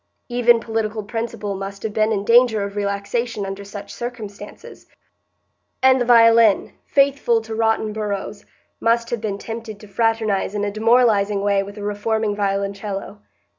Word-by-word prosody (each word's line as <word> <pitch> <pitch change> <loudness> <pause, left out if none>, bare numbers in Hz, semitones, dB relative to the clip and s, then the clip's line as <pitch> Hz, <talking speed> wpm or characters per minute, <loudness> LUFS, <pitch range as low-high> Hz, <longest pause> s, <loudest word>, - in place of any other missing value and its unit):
Even 240 -1 +4
political 220 -1 -3
principle 215 -1 -4
must 195 0 -7
have 220 -2 -3
been 215 +1 +1
in 200 -2 -1
danger 230 -2 +4
of 200 0 -6
relaxation 205 +2 -2
under 195 +1 -6
such 200 0 -9
circumstances; 215 -4 -9 1.0
and 260 -1 +5
the - - +1
violin, 230 -3 +5
faithful 275 -4 +2
to 225 0 -8
rotten 220 -1 0
boroughs, 205 -1 -4 0.4
must 235 0 +1
have 235 -3 -2
been 205 -3 -3
tempted 225 -1 -7
to 210 - -13
fraternise 215 -1 0
in 205 0 -1
a 205 - -2
demoralizing 215 -2 +3
way 200 -1 +2
with 200 +1 -9
a 205 - -7
reforming 210 +1 -1
violoncello. 200 0 -3
215 Hz, 150 wpm, -21 LUFS, 200-230 Hz, 1.0 s, and